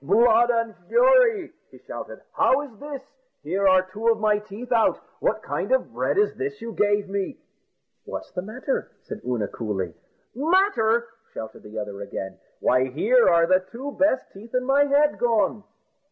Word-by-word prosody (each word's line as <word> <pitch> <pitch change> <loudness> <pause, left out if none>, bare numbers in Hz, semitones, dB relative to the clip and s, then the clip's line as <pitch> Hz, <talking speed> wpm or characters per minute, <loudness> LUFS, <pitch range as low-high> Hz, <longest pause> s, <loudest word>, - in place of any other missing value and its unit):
"Blood 230 - +4
and 230 -2 0
fury!" 485 -5 +4 0.2
he - - -16
shouted; - - -9
"how 270 - +3
is 280 -6 -10
this? 285 -2 -7 0.4
Here 195 +1 +1
are 185 0 +5
two 210 +5 -5
of 225 -1 +3
my 210 -1 +2
teeth 215 +4 -10
out! 230 -2 +3 0.2
What - - 0
kind - - -3
of - - +1
bread - - -1
this 415 0 0
is - - -24
you 230 - -6
gave 205 -1 +1
me." 200 +6 -3 0.7
"What's - - -7
the 180 - -4
matter?" 230 +7 -3
said - - -8
Oonagh 120 -4 -2
coolly. 95 -6 -3 0.4
"Matter!" 255 - +2 0.3
shouted 110 0 -7
the 105 +1 -10
other 105 -1 -5
again; 95 -1 -6 0.2
"why, 130 +1 +3
here 215 - +3
are 170 -1 +5
the 185 +1 +3
two 265 +5 -6
best 285 -2 +2
teeth 225 +5 -10
in 250 0 +1
my 280 +2 +4
head 290 +1 +2
gone." 225 -3 +1
225 Hz, 170 wpm, -24 LUFS, 185-275 Hz, 0.7 s, are